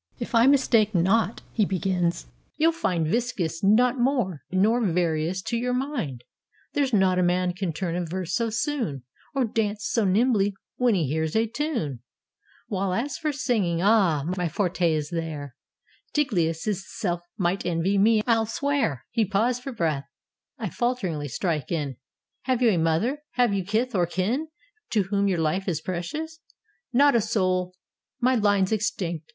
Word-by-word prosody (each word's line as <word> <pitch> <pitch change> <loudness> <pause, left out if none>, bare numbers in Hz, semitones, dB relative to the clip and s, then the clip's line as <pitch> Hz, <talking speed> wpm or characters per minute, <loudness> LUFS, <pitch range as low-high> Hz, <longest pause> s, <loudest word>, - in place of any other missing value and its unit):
"If - - -6
I 230 +2 +5
mistake 230 -7 +4
not," 195 +6 +2
he 220 - +1
begins, 180 - 0 0.3
"you'll 325 +2 +4
find 180 - -1
Viscus 195 -4 -1
not 240 +6 +4
more, 240 - 0
nor 215 +6 +2
Varius, 170 -1 0
to 235 - -1
your 250 +1 -1
mind: 245 - -3 0.5
There's 280 -2 +1
not 190 -4 +3
a - - +3
man 180 0 +1
can 185 -1 -2
turn 170 +1 -3
a 180 - -1
verse 175 +1 -4
so 230 -1 +1
soon, 225 - -2 0.3
Or 265 -2 +2
dance 215 -1 -1
so 230 - +1
nimbly 205 0 +2 0.2
when 245 -4 +3
he 170 -5 +1
hears 160 +2 -1
a 225 +1 +3
tune: 230 - -3 0.7
While, 190 -2 -1
as 265 +6 -2
for 305 -1 0
singing 210 - 0
— - - -1
ah! 190 -9 +4
my 180 -2 -1
forte 175 -1 +1
is 150 -2 -2
there: 155 -6 -4 0.6
Tigellius' 190 - 0
self 175 -4 -2 0.2
might 185 0 0
envy 180 +3 +1
me, 215 +1 +4
I 235 - +4
'11 225 -1 0
swear." 230 - -1
He 230 -2 +2
paused 220 +5 +1
for 270 - -5
breath: 160 - -1 0.5
I 230 - -4
f 180 - -7
alteringly 190 - -1
strike 150 +2 -2
in: 145 -7 -2 0.5
"Have 255 -1 +1
you 235 - +6
a 185 - +1
mother? 165 - +1
have 245 -4 +2
you 195 -1 0
kith 225 +6 -1
or 175 -4 +2
kin 210 - -1 0.5
To 210 -3 +3
whom 200 0 +2
your 190 -3 +1
life 165 +5 0
is 170 -5 0
precious?" 300 - -5 0.5
"Not 285 +3 +5
a 235 - +4
soul: 185 -4 0 0.4
My 255 +1 +3
line's 205 -4 +2
extinct! 180 -6 -2
195 Hz, 170 wpm, -25 LUFS, 170-235 Hz, 0.7 s, you